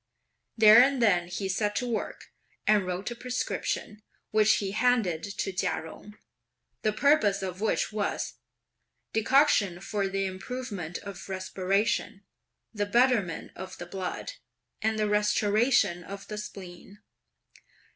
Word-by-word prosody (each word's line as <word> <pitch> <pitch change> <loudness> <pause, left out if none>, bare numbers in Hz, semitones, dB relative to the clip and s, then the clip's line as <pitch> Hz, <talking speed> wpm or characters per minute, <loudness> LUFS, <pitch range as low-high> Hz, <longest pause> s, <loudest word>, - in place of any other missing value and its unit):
There 220 +1 +9
and 270 +1 +3
then 180 -7 +3
he 190 +2 -3
set 205 +2 -1
to 250 - -1
work 230 -2 -4 0.3
and 210 -3 +3
wrote 185 +5 -3
a - - -5
prescription, 245 -3 -3 0.3
which 215 0 +5
he 195 -2 -2
handed 215 -7 +1
to 200 -1 -4
Chia 180 - -1
Jung, 210 +6 -12 0.6
the 215 - +1
purpose 210 -6 +3
of 185 0 -5
which 220 - 0
was: 210 -1 -2 0.8
Decoction 220 - +3
for 200 +1 -2
the 195 0 -1
improvement 190 -3 -5
of 195 -1 -9
respiration, 195 +2 -1 0.5
the 205 -1 -1
betterment 235 -6 +2
of 190 0 -8
the 175 - -7
blood, 185 - -5 0.5
and 220 0 0
the 215 -1 +1
restoration 210 -2 +2
of 195 +2 -9
the 210 0 -4
spleen. 195 -1 -10
205 Hz, 130 wpm, -28 LUFS, 190-220 Hz, 0.8 s, There